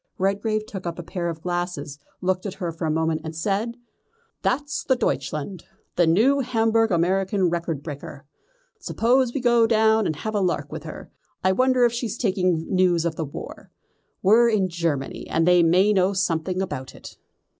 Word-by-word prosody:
Redgrave 210 +3 0
took 190 -4 -7
up 170 - -4
a 175 - -6
pair 170 0 -3
of 160 -1 -7
glasses, 175 -5 -3 0.2
looked 185 +1 -1
at 190 - -6
her 175 -3 -3
for 165 0 -4
a - - 0
moment 160 0 0
and 160 0 -6
said: 210 +7 -2 0.6
"That's 290 +3 -1
the 260 - +2
Deutschland, 150 - -3 0.3
the 175 -2 +3
new 230 +12 +4
Hamburg 225 -3 +2
American 190 +1 +1
record 165 -4 -3
breaker. 145 -2 -8 0.5
Suppose 250 +2 +1
we 270 - -3
go 235 -2 +4
down 220 -1 +3
and 155 - -2
have 215 +9 -5
a 205 - +1
lark 180 -2 -1
with - - -7
her. - - -9 0.3
I 185 - +4
wonder 255 +4 +3
if 235 - +1
she's 235 -2 -3
taking 185 -7 0
news 180 -3 +2
of 165 -1 -1
the 160 - -3
war. 140 - -9 0.5
We're 230 +5 +5
in 215 -4 +2
with 185 - -2
Germany, 165 -5 -3
and 165 +1 +1
they 180 -1 +6
may 185 +5 +4
know 190 0 +2
something 185 0 -1
about 130 -8 -6
it." - - -12
185 Hz, 185 wpm, -23 LUFS, 165-220 Hz, 0.6 s, they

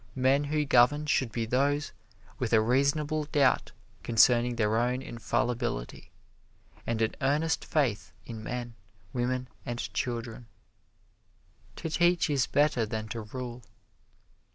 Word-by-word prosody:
Men 135 +2 +2
who 150 +1 0
govern 140 +3 +4
should 130 -5 +1
be 115 +1 -2
those 140 +5 0 0.5
with 120 -2 -2
a 110 - +7
reasonable 140 +6 +1
doubt 145 -3 +2 0.3
concerning 120 +1 +4
their 110 -1 +1
own 125 +2 0
infallibility, 120 - -3 0.8
and 115 -1 0
an 110 - -1
earnest 150 +3 +1
faith 130 -9 0
in 115 -2 -7
men, 120 +1 -5 0.4
women 125 +1 -1 0.2
and 120 -1 -4 0.2
children. 115 0 -4 1.3
To 160 - -5
teach 175 -1 +2
is 135 -4 +2
better 145 -5 +2
than 110 0 -4
to 115 - -4
rule. 120 +2 -7
125 Hz, 125 wpm, -29 LUFS, 115-145 Hz, 1.3 s, a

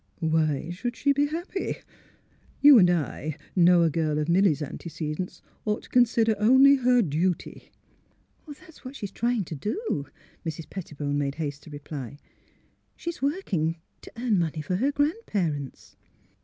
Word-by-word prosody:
Why 160 -2 0
should 240 +7 -4
she 280 +3 +2
be 285 +1 +2
happy? 345 +5 -4 0.8
You 285 -4 +9
and 180 -3 +6
I 155 -2 -2 0.2
know 175 -1 +6
a 165 - +2
girl 155 -1 0
of 150 0 -1
Milly 175 -1 +4
's 150 - -5
antecedents 155 +3 -6 0.2
ought 210 0 -1
to - - -15
consider 230 -2 +3
only 260 +6 +6
her 250 -2 +3
duty." 170 +2 -2 0.4
" - - -40
That's 300 +2 -13
what 260 +1 -8
she's 205 -7 -6
trying 235 0 0
to 165 - -8
do," 205 - -3 0.4
Mrs. 160 0 -5
Petti 170 -6 -8
bone 145 0 -1
made 140 -1 -2
haste 145 -2 -4
to - - -11
reply. 145 -3 -7 0.4
" - - -41
She's 340 0 -6
working 210 - -1 0.3
to - - -12
earn 230 -5 +1
money 160 -2 -2
for 180 +5 -1
her 265 +8 +1
grandparents." 205 - -2
180 Hz, 160 wpm, -26 LUFS, 155-250 Hz, 0.8 s, You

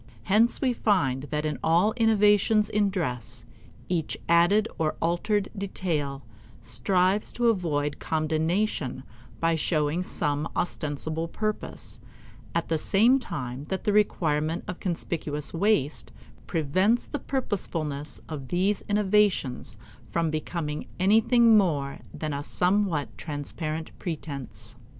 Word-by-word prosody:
Hence 215 - +3
we 255 -3 +2
find 145 - +1
that 150 0 -1
in 150 -2 -2
all 175 +7 +3
innovations 210 -2 +4
in 205 -1 +2
dress, 125 - -4 0.4
each 170 -4 -1
added 175 +6 +4
or 155 -1 0
altered 195 +5 0
detail 160 -8 -2 0.4
strives 185 - +1
to 240 -1 +2
avoid 150 -8 0
condemnation 160 - -1 0.4
by 165 0 +2
showing 155 0 0
some 150 -4 -2
ostensible 160 -1 -2
purpose, 215 +5 -4 0.6
at 170 - 0
the 160 -1 0
same 235 - +4
time 130 - -5
that 190 +4 -3
the 210 - +1
requirement 160 -6 +1
of 180 - -5
conspicuous 160 -4 -3
waste 165 -5 +1 0.4
prevents 185 +9 +2
the 290 - -4
purposefulness 165 - -3
of 145 -4 -6
these 190 +6 +1
innovations 200 - +1 0.3
from 165 -2 0
becoming 155 -1 -3
anything 225 +4 +5
more 150 -9 +1
than 155 -1 -4
a 140 - -2
somewhat 180 -2 0
transparent 155 +1 -4
pretense. 140 - -6
170 Hz, 115 wpm, -27 LUFS, 150-205 Hz, 0.6 s, anything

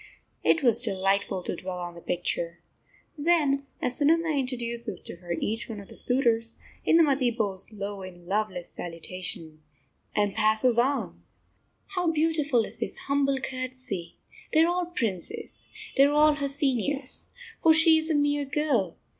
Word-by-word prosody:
It 330 - +3
was 235 -2 +4
delightful 195 -3 0
to - - -3
dwell 180 +1 -5
on 175 -1 -5
the 170 - -11
picture. 170 -1 -2 0.6
Then 290 -4 +2 0.2
as 250 +3 0
Sunanda 320 +1 +3
introduces 235 -6 -3
to - - -8
her 175 0 -5
each 220 +8 -2
one 220 -2 -5
of 200 - -12
the - - -10
suitors, 230 -3 +1 0.3
Indumati 285 -6 +5
bows 200 -2 -1
low 200 -1 -5
in 175 -2 -10
loveless 190 -2 -1
salutation, 165 -2 -7 0.5
and 205 -1 +2
passes 220 +3 +3
on. 270 +4 0 0.7
How 360 -4 0
beautiful 300 -6 +2
is - - -8
this - - -3
humble 275 -1 +1
courtesy! 255 -9 -5 0.4
They 315 0 +6
are 335 - +3
all 355 -1 -1
princes. 220 - -4 0.3
They 275 - +7
are 285 - +2
all 300 +1 +6
her 285 -1 -2
seniors. 275 -1 -1 0.3
For 325 - +6
she 320 0 +6
is 315 +1 -2
a 315 - +2
mere 290 0 +2
girl. 270 - 0
245 Hz, 155 wpm, -27 LUFS, 195-290 Hz, 0.7 s, They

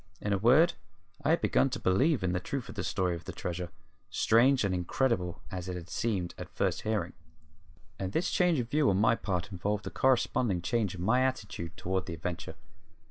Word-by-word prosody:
In 105 - -1
a - - +2
word, 145 - +5 0.5
I 145 - +1
had 165 - +3
begun 135 - +3
to - - -4
believe 130 - +2
in 90 - +1
the 90 - 0
truth 135 +6 -4
of - - -6
the 100 - -4
story 95 -3 0
of 85 -2 -9
the - - -5
treasure, 90 0 -4 0.4
strange 125 +3 +4
and 100 -2 +1
incredible 90 0 -1
as 90 0 -5
it 90 - -3
had 85 -1 -8
seemed 100 -7 -1
at - - -7
first - - -1
hearing. 105 -5 -1 0.9
And 95 -1 -3
this 175 - 0
change 180 -3 +3
of 120 -3 -1
view 150 -1 +3
on 95 - +2
my 110 +3 +4
part 95 -4 -2
involved 100 +3 -2
a - - -4
corresponding 120 -7 +1
change 105 -3 0
in 90 - -5
my 120 +6 +3
attitude 105 -10 -3
toward 95 +1 -2
the 85 - -4
adventure. 85 -1 -5
100 Hz, 205 wpm, -30 LUFS, 90-125 Hz, 0.9 s, word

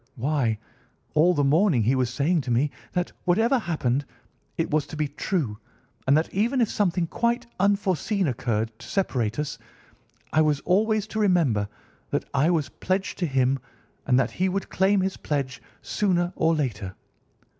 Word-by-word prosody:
Why, 125 -3 0 0.6
all 170 +4 +4
the 145 - +2
morning 150 - +3
he 120 +5 +3
was 130 -2 +1
saying 145 +7 +1
to 130 - -4
me 135 +5 +2 0.2
that, 180 0 -1
whatever 225 +8 +3
happened, 145 - 0 0.5
I 165 - +1
was 150 -2 0
to - - -8
be 150 -1 0
true; 140 - -2 0.5
and 140 +3 +6
that 160 - -1
even 235 +7 +1
if 230 - +2
something 180 -4 +1
quite 235 +7 0
unforeseen 200 -1 +1
occurred 115 -3 -1
to 115 - -11
separate 120 - -1
us, 150 0 -3 0.7
I 155 - +5
was 150 -2 +2
always 215 +3 +2
to 220 0 -4
remember 155 - +2 0.4
that - - -1
I 140 +4 +3
was 155 -6 +1
pledged 190 +1 -2
to 175 - +1
him, 135 -1 +2 0.5
and 125 0 +4
that 125 - +1
he 185 +1 0
would 195 +1 -3
claim 195 +1 +3
his 190 +1 -1
pledge 140 -4 -3 0.2
sooner 180 -3 0
or 160 0 +2
later. 115 -10 -3
155 Hz, 165 wpm, -25 LUFS, 130-190 Hz, 0.7 s, and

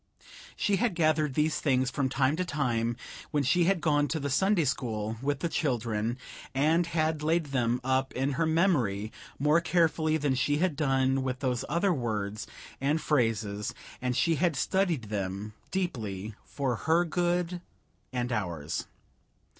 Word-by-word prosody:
She 200 -1 +1
had 215 -2 +1
gathered 155 -4 +2
these 155 +1 +1
things 130 -3 +1
from 135 -1 0
time 135 +2 +2
to 185 - +1
time 120 -8 -1 0.3
when 145 -2 +1
she 170 +6 +3
had 190 -2 +2
gone 145 -2 +2
to 160 - -2
the 140 -1 -2
Sunday 190 +3 +3
school 110 -5 -2
with 145 0 -1
the - - +1
children, 120 -7 -1 0.4
and 160 +5 +3
had 155 -2 0
laid 155 -1 +1
them 120 -2 +1
up 130 +1 +1
in 135 +2 0
her 160 +4 0
memory 130 - +1 0.3
more 150 +4 +3
carefully 160 -3 +2
than 145 -3 +1
she 145 +3 +1
had 175 -1 +1
done 135 -2 +2
with 130 0 -3
those 125 -3 0
other 175 +5 +2
words 110 -6 -3 0.3
and 145 +4 +2
phrases; 110 -8 0 0.3
and 125 0 -1
she 165 -2 +2
had 170 -2 +2
studied 175 -2 +1
them 100 +1 -3 0.2
deeply, 110 - -3
for 135 -4 -2
her 165 +2 +2
good 175 +1 0 0.5
and 125 -1 -2
ours. 85 -9 -3
140 Hz, 155 wpm, -29 LUFS, 120-165 Hz, 0.5 s, she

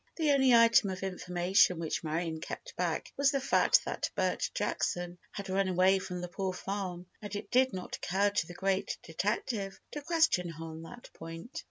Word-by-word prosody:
The 310 -3 +2
only 265 -2 +4
item 230 -3 +6
of 185 0 -5
information 180 0 +2
which 165 0 -3
Marion 160 +1 -2
kept - - -7
back - - -2
was 280 0 +4
the 280 -1 +1
fact - - +3
that - - -2
Bert - - 0
Jackson 175 0 -2
had 200 -1 -6
run 195 +1 +1
away 185 +1 +4
from 180 -1 -5
the 180 - -4
Poor 185 +1 -3
Farm, 185 -2 -4 0.2
and 205 -1 -6
it 205 - -6
did 260 +1 +4
not 185 -1 -5
occur 200 +3 +1
to 165 -5 0
the 175 - -9
great 195 0 -1
detective 195 +3 -2
to 295 - -5
question 320 - +2
her 165 0 -7
on 160 0 -8
that 205 +9 -11
point. 165 +8 -8
190 Hz, 190 wpm, -31 LUFS, 175-210 Hz, 0.2 s, item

